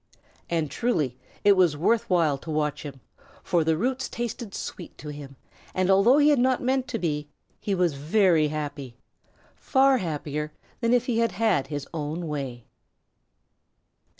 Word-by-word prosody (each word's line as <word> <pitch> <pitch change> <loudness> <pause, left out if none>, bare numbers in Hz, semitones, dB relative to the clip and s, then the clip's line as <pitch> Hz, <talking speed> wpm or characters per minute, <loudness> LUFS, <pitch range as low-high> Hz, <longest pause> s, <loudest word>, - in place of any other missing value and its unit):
And 160 -4 -1
truly 155 - 0 0.3
it 205 - +6
was 180 -6 +4
worth 220 +8 +1
while 165 -6 +3
to 160 - -11
watch 150 -1 -1
him, 140 -3 -9 0.4
for 170 -2 +2
the 160 0 +1
roots 260 +7 -1
tasted 235 -3 -5
sweet 175 - -7
to 150 - -8
him, 145 -2 -9 0.4
and, 185 +1 +2
although 205 +8 +5
he 295 0 +5
had 290 -4 +4
not 255 +1 +3
meant 260 0 0
to - - -3
be, 150 -6 -2 0.3
he 200 - -1
was 180 -4 +2
very 160 +2 +3
happy 145 -4 -5 0.6
far 270 -1 +3
happier 150 -3 -4 0.3
than 230 -1 +1
if 245 0 +3
he 235 -3 0
had 230 0 +1
had 215 -11 +1
his 145 -2 -5
own 160 +2 -3
way. 135 -6 -5
170 Hz, 160 wpm, -26 LUFS, 150-230 Hz, 0.6 s, it